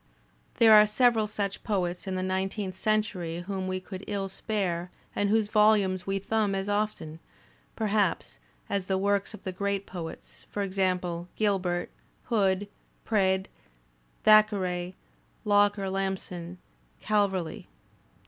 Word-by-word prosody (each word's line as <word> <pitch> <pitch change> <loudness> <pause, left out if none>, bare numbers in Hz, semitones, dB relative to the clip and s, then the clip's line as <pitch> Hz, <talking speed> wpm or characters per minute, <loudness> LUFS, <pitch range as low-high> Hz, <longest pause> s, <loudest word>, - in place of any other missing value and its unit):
There 225 -2 +7
are 210 0 +8
several 225 0 +3
such 200 -2 -3
poets 180 -3 -2
in 190 - -2
the 185 - -2
nineteenth 190 +1 -2
century 200 -6 -1
whom 190 0 -4
we 185 0 -2
could 185 +1 -9
ill 200 -2 -2
spare 185 -4 -2 0.3
and 205 - +1
whose 215 0 +2
volumes 205 -4 +3
we 195 0 0
thumb 205 0 0
as 195 +1 -2
often, 205 -6 -2 0.6
per 220 - -2
haps, 210 -1 0 0.3
as 195 -2 -2
the 190 - +1
works 200 +2 0
of - - -15
the 190 - -3
great 200 +1 -2
poets: 170 -3 -9
for 205 - -2
example, 180 -3 -1
Gilbert, 185 -4 0 0.3
Hood, 200 -4 +1 0.4
Praed, 190 -3 +2 0.8
Thackeray, 190 -4 +4 0.5
Locker 205 -1 +3
Lamson, 190 -2 -3 0.4
Calverley. 195 -5 0
195 Hz, 130 wpm, -28 LUFS, 185-210 Hz, 0.8 s, are